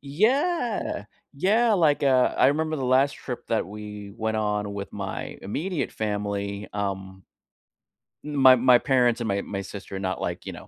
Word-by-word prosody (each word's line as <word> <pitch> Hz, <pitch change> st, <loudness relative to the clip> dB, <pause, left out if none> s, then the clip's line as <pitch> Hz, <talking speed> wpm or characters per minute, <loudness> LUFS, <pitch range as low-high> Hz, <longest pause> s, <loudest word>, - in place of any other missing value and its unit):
Yeah! 230 Hz, -, 0 dB, 0.3 s
Yeah, 215 Hz, +10 st, +3 dB
like, 155 Hz, -7 st, +3 dB
uh, 130 Hz, -2 st, +3 dB
I -, -, +5 dB
remember 155 Hz, +2 st, 0 dB
the 135 Hz, -, -3 dB
last 130 Hz, +2 st, +3 dB
trip 125 Hz, -2 st, -7 dB
that 115 Hz, -, 0 dB
we 105 Hz, 0 st, -8 dB
went 110 Hz, -1 st, -1 dB
on 105 Hz, -1 st, -1 dB
with 100 Hz, 0 st, -6 dB
my 100 Hz, -2 st, -5 dB
immediate 150 Hz, -, -3 dB
family, 100 Hz, -1 st, -3 dB
um 95 Hz, -2 st, -4 dB, 1.0 s
my 140 Hz, -3 st, +5 dB
my 125 Hz, 0 st, +6 dB
parents 125 Hz, -2 st, +2 dB
and 115 Hz, -, -2 dB
my 100 Hz, 0 st, +1 dB
my 100 Hz, -1 st, -5 dB
sister, 100 Hz, 0 st, -8 dB
not 95 Hz, -1 st, -3 dB
like, -, -, -4 dB
you -, -, -5 dB
know, -, -, -11 dB
115 Hz, 165 wpm, -25 LUFS, 100-145 Hz, 1.0 s, my